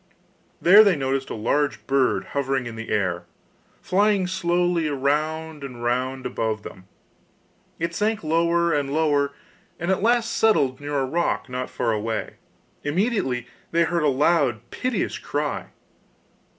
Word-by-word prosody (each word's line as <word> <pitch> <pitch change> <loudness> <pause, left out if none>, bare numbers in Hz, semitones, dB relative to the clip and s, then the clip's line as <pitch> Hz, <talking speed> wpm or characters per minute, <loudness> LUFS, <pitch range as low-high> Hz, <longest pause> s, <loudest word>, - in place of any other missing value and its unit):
There 200 +5 +8
they 200 -4 +4
noticed 135 -1 -2
a - - -4
large 140 +6 0
bird 130 -8 +1
hovering 135 -2 0
in 115 -1 -6
the 115 0 -7
air, 90 -4 -1 0.6
flying 200 0 +2
slowly 175 -2 +1
round 150 +2 -1
and 125 -3 -7
round 130 +2 -1
above 110 -2 -2
them; 95 0 -11 0.9
it 170 0 -2
sank 210 +3 0
lower 170 +2 +2
and 140 -2 0
lower, 145 -2 +2 0.5
and 175 +3 -1
at 190 - +1
last 235 +1 +2
settled 145 -13 +2
near 145 0 -2
a 135 - +1
rock 165 0 -1
not 125 0 -4
far 115 - -1
away. 110 0 -3 0.5
Immediately 145 - 0 0.2
they 170 +1 +3
heard 170 0 0
a 150 - +2
loud, 140 -4 +2
piteous 255 -1 -2
cry. - - -3
145 Hz, 140 wpm, -24 LUFS, 130-170 Hz, 0.9 s, There